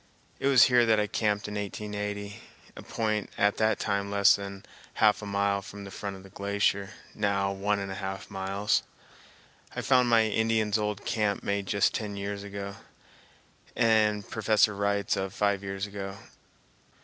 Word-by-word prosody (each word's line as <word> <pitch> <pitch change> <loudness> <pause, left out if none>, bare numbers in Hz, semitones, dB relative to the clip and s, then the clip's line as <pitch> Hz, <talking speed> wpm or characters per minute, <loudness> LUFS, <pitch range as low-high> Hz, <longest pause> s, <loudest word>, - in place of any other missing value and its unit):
It - - 0
was 135 -3 +7
here 125 -1 +5
that 110 -1 +4
I 105 - +2
camped 105 -1 -1
in 105 - -6
1880, 105 0 -4 0.3
a - - -9
point 110 -2 -2
at 105 0 +2
that 110 -1 +2
time 100 -1 -1
less 100 0 +5
than 100 -1 -7 0.3
half 105 -1 +4
a 105 - -6
mile 100 0 +1
from 100 0 -10
the 100 - -9
front 100 0 -5
of 95 - -12
the 95 - -14
glacier, 100 0 0 0.2
now 100 -2 0
one 100 +1 0
and 100 -1 -4
a 95 +2 -6
half 95 0 -5
miles. 95 +1 0 0.9
I - - -2
found 125 -2 +3
my 115 -1 +5
Indian's 110 0 +1
old 105 -1 -3
camp 105 -3 0
made 100 -1 -1
just 100 0 +2
ten 105 -2 -3
years 100 0 -4
ago, 100 0 -6 1.0
and 105 -2 +3
Professor 110 -1 +2
Wright's 100 0 0
of 95 -1 -3
five 100 -1 +1
years 95 0 -4
ago. 100 -1 -6
100 Hz, 170 wpm, -28 LUFS, 100-105 Hz, 1.0 s, was